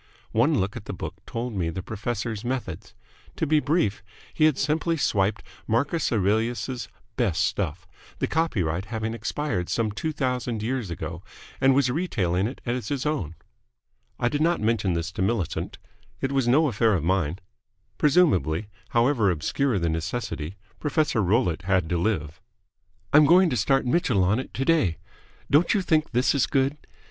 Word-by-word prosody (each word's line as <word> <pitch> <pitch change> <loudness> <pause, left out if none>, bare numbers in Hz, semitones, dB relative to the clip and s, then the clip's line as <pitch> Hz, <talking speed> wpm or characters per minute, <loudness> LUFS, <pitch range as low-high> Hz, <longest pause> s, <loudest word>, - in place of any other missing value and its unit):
One 125 +5 +3
look 95 +2 -1
at 105 - -7
the - - -5
book - - -7
told 120 +1 -4
me 90 -5 -1
the 90 +3 -5
professor's 110 +1 -4
methods. 110 -7 -4 0.4
To - - -1
be 155 0 +3
brief, 145 - 0 0.3
he 155 - +3
had 155 -4 +3
simply 160 +3 0
swiped 100 -6 +1 0.2
Marcus 140 +9 +1
Aurelius's 115 +4 0 0.3
best 95 -8 +1
stuff, 85 -4 -2 0.3
the - - 0
copyright 95 - 0
having 110 +1 -3
expired 115 -4 -2
some 110 -2 0
two 155 +10 -3
thousand 125 -6 -2
years 120 -3 -2
ago, 85 +1 -5 0.4
and 135 0 +5
was 135 -2 +3
retailing 100 - 0
it 130 - -8
as 120 -3 -2
his 140 +1 -2
own. 130 - -2 0.8
I 120 - +2
did 145 +4 -1
not 170 +2 +2
mention 105 -4 +1
this 85 +1 -2
to 95 - -5
Millicent. 95 -3 -1 0.4
It 135 - -1
was 135 -3 +1
no 150 +6 +4
affair 115 -3 +2
of 85 - -1
mine. 90 -2 0 0.6
Presumably, 110 - +3 0.2
however 115 -3 +3
obscure 100 - 0
the 85 -2 0
necessity, 80 +1 -3 0.2
Professor 150 -6 +1
Rollitt 95 -3 +1
had 95 -3 +2
to 90 - +1
live. 85 -6 -2 0.7
"I'm 150 +1 +8
going 180 +1 +6
to - - 0
start 135 +5 +2
Mitchell 125 - +2
on 100 +6 +2
it 130 - -6
today. 135 - +1 0.5
Don't 155 +8 +4
you 200 - +1
think 155 -3 +2
this 125 +2 +2
is 140 -4 +2
good? 135 +1 +1
115 Hz, 165 wpm, -25 LUFS, 95-140 Hz, 0.8 s, I'm